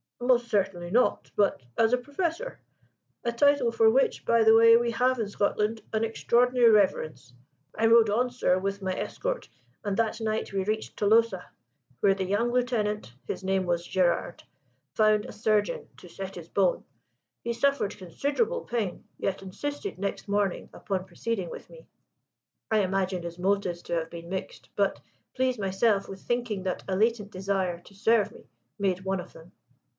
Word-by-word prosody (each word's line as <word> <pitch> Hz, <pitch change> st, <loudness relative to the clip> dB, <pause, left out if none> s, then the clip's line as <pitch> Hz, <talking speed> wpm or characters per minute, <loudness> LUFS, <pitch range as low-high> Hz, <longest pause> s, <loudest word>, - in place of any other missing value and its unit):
"Most 245 Hz, -1 st, +2 dB
certainly 190 Hz, -4 st, 0 dB
not, 245 Hz, +4 st, +2 dB
but 200 Hz, -8 st, +2 dB, 0.2 s
as 225 Hz, +1 st, +3 dB
a -, -, +5 dB
Professor 330 Hz, -, -3 dB, 0.6 s
a 235 Hz, -, 0 dB
title 285 Hz, 0 st, +3 dB
for 225 Hz, -1 st, +4 dB
which, 265 Hz, +4 st, +2 dB
by 230 Hz, -1 st, +4 dB
the 220 Hz, 0 st, +7 dB
way, 230 Hz, 0 st, +8 dB
we 235 Hz, 0 st, 0 dB
have 250 Hz, +2 st, +1 dB
in 220 Hz, -, -1 dB
Scotland 210 Hz, +2 st, 0 dB
an 220 Hz, 0 st, +1 dB
extraordinary 240 Hz, +2 st, +3 dB
reverence. 155 Hz, -, +1 dB, 0.4 s
I 225 Hz, -, +3 dB
rode 225 Hz, -1 st, +6 dB
on, 245 Hz, +5 st, +1 dB
sir, 245 Hz, -7 st, +1 dB
with 195 Hz, +1 st, -3 dB
my 190 Hz, -1 st, -1 dB
escort, -, -, -3 dB, 0.3 s
and 205 Hz, -2 st, -2 dB
that 225 Hz, 0 st, 0 dB
night 220 Hz, -2 st, -2 dB
we 195 Hz, -1 st, 0 dB
reached 215 Hz, +2 st, -3 dB
Tolosa, 210 Hz, -3 st, +3 dB, 0.6 s
where 195 Hz, -, +4 dB
the 195 Hz, -, -2 dB
young 210 Hz, +6 st, +1 dB
Lieutenant 215 Hz, -, -1 dB
his -, -, -4 dB
name 190 Hz, 0 st, +1 dB
was 175 Hz, -1 st, -1 dB
Gerard 175 Hz, -2 st, 0 dB, 0.5 s
found 215 Hz, -1 st, +3 dB
a -, -, -8 dB
surgeon 210 Hz, -1 st, 0 dB
to -, -, -13 dB
set 195 Hz, +2 st, -7 dB
his 170 Hz, -2 st, -9 dB
bone. 190 Hz, -3 st, +1 dB, 0.6 s
He 235 Hz, -, -1 dB
suffered 275 Hz, -4 st, 0 dB
considerable 285 Hz, -, -1 dB
pain, 225 Hz, -, -3 dB
yet 195 Hz, 0 st, -2 dB
insisted 290 Hz, -, -5 dB
next 200 Hz, +2 st, -3 dB
morning 200 Hz, -2 st, -1 dB
upon 190 Hz, -2 st, -3 dB
proceeding 200 Hz, -4 st, -3 dB
with -, -, -9 dB
me. -, -, -15 dB, 0.8 s
I 220 Hz, -, +4 dB
imagine 190 Hz, -2 st, 0 dB
his 170 Hz, 0 st, -6 dB
motives 185 Hz, -2 st, 0 dB
to -, -, -3 dB
have 165 Hz, -1 st, -2 dB
been 170 Hz, 0 st, -9 dB
mixed; 190 Hz, -, -6 dB
but -, -, +1 dB, 0.4 s
please 255 Hz, -2 st, 0 dB
myself 195 Hz, +1 st, +1 dB
with 195 Hz, 0 st, -9 dB
thinking 240 Hz, -5 st, -2 dB
that 185 Hz, -1 st, -3 dB
a 190 Hz, -, -1 dB
latent 215 Hz, 0 st, +1 dB
desire 190 Hz, -2 st, -1 dB
to 190 Hz, -, -18 dB
serve 210 Hz, +1 st, +2 dB
me -, -, -16 dB, 0.3 s
made 185 Hz, -2 st, 0 dB
one 190 Hz, 0 st, -1 dB
of 180 Hz, -, -9 dB
them. 165 Hz, +2 st, -15 dB
210 Hz, 170 wpm, -27 LUFS, 190-235 Hz, 0.8 s, way